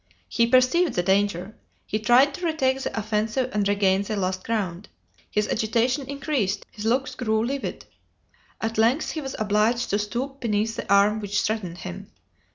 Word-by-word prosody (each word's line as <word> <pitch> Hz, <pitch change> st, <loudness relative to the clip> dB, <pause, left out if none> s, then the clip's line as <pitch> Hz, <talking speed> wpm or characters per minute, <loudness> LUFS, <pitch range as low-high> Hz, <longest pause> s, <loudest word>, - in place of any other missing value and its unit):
He 230 Hz, 0 st, +2 dB
perceived 255 Hz, +8 st, +3 dB
the 175 Hz, -, +1 dB
danger; 195 Hz, +1 st, 0 dB, 0.3 s
he 215 Hz, -, -2 dB
tried 250 Hz, +6 st, +5 dB
to 360 Hz, -, -8 dB
retake 270 Hz, -4 st, +1 dB
the 225 Hz, -, -3 dB
offensive 220 Hz, +4 st, -1 dB
and 205 Hz, -1 st, +1 dB
regain 200 Hz, -1 st, +2 dB
the 205 Hz, +2 st, -3 dB
lost 185 Hz, -1 st, -2 dB
ground. 200 Hz, -4 st, -3 dB, 0.4 s
His 210 Hz, 0 st, 0 dB
agitation 240 Hz, +5 st, 0 dB
increased, 270 Hz, -9 st, -1 dB
his 210 Hz, -1 st, -7 dB
looks 255 Hz, +3 st, +1 dB
grew 220 Hz, -3 st, 0 dB
livid. 275 Hz, +2 st, -4 dB, 0.7 s
At 225 Hz, 0 st, -2 dB
length 240 Hz, +7 st, +2 dB
he 315 Hz, -, -4 dB
was 270 Hz, -2 st, -5 dB
obliged 215 Hz, +3 st, +1 dB
to 205 Hz, -, +2 dB
stoop 250 Hz, +6 st, -4 dB
beneath 225 Hz, -2 st, 0 dB
the -, -, -5 dB
arm 205 Hz, +2 st, +4 dB
which 205 Hz, -1 st, -1 dB
threatened 200 Hz, -6 st, -2 dB
him. 85 Hz, -, -8 dB
220 Hz, 165 wpm, -24 LUFS, 205-255 Hz, 0.7 s, tried